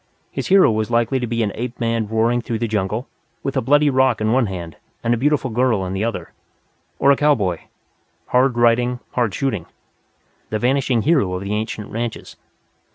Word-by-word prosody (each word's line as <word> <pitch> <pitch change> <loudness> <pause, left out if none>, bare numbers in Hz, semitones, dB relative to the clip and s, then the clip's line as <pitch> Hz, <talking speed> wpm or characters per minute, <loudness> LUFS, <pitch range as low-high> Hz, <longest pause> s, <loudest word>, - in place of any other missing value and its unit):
His - - -4
hero 195 -9 +6
was 110 0 -1
likely 120 +3 +1
to 120 - -3
be 115 0 0
an 105 - -1
ape 120 +1 -5
man 115 -2 0
roaring 115 +3 +1
through 115 -1 -3
the 115 - -2
jungle, 105 +3 -2 0.4
with - - -3
a - - +2
bloody 145 +5 +3
rock 130 -3 +2
in 110 0 0
one 125 -1 +2
hand 85 -5 -7 0.3
and 115 - +2
a - - +3
beautiful 135 +1 0
girl 115 -4 +1
in 90 - -4
the 95 +2 -2
other. 115 0 -3 0.7
Or 140 - +4
a - - +5
cowboy, 115 - +1 0.7
"hard 125 0 +2
riding, 120 +1 +2
hard 120 -4 0
shooting," 115 - -2 0.8
the 110 - -1
vanishing 125 -1 +1
hero 140 - +2
of 90 - -4
the 100 +1 -3
ancient 110 0 -4
ranches. 115 0 -5
115 Hz, 190 wpm, -20 LUFS, 110-130 Hz, 0.8 s, hero